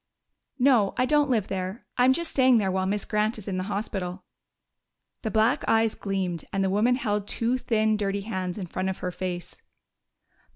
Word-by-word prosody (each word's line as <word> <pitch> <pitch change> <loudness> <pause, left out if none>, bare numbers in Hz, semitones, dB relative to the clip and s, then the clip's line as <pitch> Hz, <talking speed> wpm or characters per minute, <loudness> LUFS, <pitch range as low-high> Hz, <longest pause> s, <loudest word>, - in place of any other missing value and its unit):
"No, 245 -7 +3
I 255 - +3
don't 295 +1 +3
live 220 -6 +1
there. 190 +3 -4
I'm 250 +1 +5
just 335 +4 -1
staying 260 -2 +5
there 195 -3 +1
while 190 0 0
Miss 205 +1 -1
Grant 215 +1 0
is 215 - -9
in 190 -2 -2
the 185 - -2
hospital." 195 -3 -3 1.0
The 220 - -2
black 225 +7 +2
eyes 225 -1 +3
gleamed, 190 -4 -3
and 195 0 0
the 190 - +1
woman 225 +5 +3
held 210 -4 -1
two 240 +4 0
thin, 220 -3 +1
dirty 200 -1 -1
hands 185 -3 -4
in 195 - -4
front 185 +2 -3
of 190 - -3
her 180 - -1
face. 180 -1 -5
210 Hz, 190 wpm, -26 LUFS, 190-230 Hz, 1.0 s, I'm